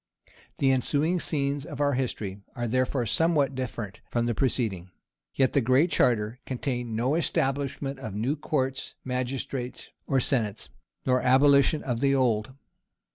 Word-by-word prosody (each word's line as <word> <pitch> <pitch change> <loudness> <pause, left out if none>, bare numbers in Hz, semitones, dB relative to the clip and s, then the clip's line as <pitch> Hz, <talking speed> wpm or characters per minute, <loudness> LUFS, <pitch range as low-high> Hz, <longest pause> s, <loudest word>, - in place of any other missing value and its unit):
The 135 -1 +3
ensuing 150 +7 +1
scenes 140 -3 0
of 150 -3 -8
our 145 -1 +2
history 110 -6 -3 0.2
are 120 -1 -2
therefore 130 +1 0
somewhat 145 +2 +2
different 120 -6 -5
from 120 -1 0
the 120 - +1
preceding. 110 -7 -1 0.5
Yet 130 -2 +2
the 140 - +4
Great 130 +8 +3
Charter 115 0 +2
contained 120 -3 -3
no 125 +5 +1
establishment 140 -3 -1
of 110 -7 -6
new 120 +8 0
courts 135 -3 -2
magistrates, 125 0 -4 0.2
or 135 - +2
senates, 115 -5 -1 0.4
nor 125 -1 +3
abolition 140 +3 +4
of 120 -3 -2
the 140 +1 +3
old. 120 -2 +1
130 Hz, 140 wpm, -27 LUFS, 120-140 Hz, 0.5 s, the